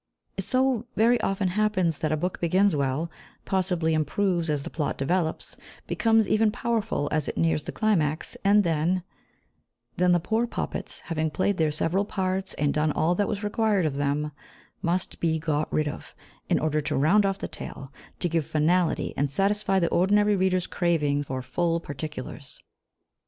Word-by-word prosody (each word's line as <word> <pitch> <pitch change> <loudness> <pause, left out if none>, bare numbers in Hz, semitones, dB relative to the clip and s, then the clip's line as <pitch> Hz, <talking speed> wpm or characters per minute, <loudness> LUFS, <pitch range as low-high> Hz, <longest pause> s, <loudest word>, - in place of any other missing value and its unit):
It - - -3
so 255 -3 +1
very 235 +2 +4
often 195 -1 0
happens 185 -5 +1
that 155 - -1
a 155 - +1
book 180 +4 -3
begins 185 +2 +3
well, 140 +4 -1 0.3
possibly 180 -4 0
improves 170 +2 0
as 145 -2 0
the - - -7
plot 150 -3 -2
develops, 160 +3 -1 0.3
becomes 225 -2 +2
even 215 +2 +3
powerful 225 -9 -1
as 155 -2 0
it - - -4
nears 165 -2 +2
the - - -4
climax, 160 -8 0
and 205 +1 +5
then 170 +2 +1 0.9
then 180 0 +3
the 175 - +4
poor 225 +7 0
puppets, - - -4
having 160 -1 -2
played 185 +5 0
their 160 -1 +2
several 165 +6 0
parts 190 -1 -2
and 145 -1 +1
done 150 0 +1
all 160 +4 +1
that 200 +3 0
was 205 - -3
required 210 -3 +1
of 150 - 0
them, 145 +2 -1 0.5
must 175 +2 -1
be 160 -1 +1
got 155 -1 -1
rid 155 -1 +1
of, 150 - -7 0.3
in - - +3
order 155 0 0
to 145 -1 -2
round 170 +10 +4
off 195 -1 0
the - - -4
tale, 135 0 -9 0.3
to 180 - +1
give 165 -1 0
finality, 170 +3 +1
and 140 +1 0
satisfy 195 +5 +1
the 170 -3 +2
ordinary 205 +3 +3
reader's 185 -1 +1
craving 150 -5 +1
for 130 -2 -4
"full 165 +6 0
particulars." 145 -2 -7
170 Hz, 175 wpm, -26 LUFS, 155-200 Hz, 0.9 s, and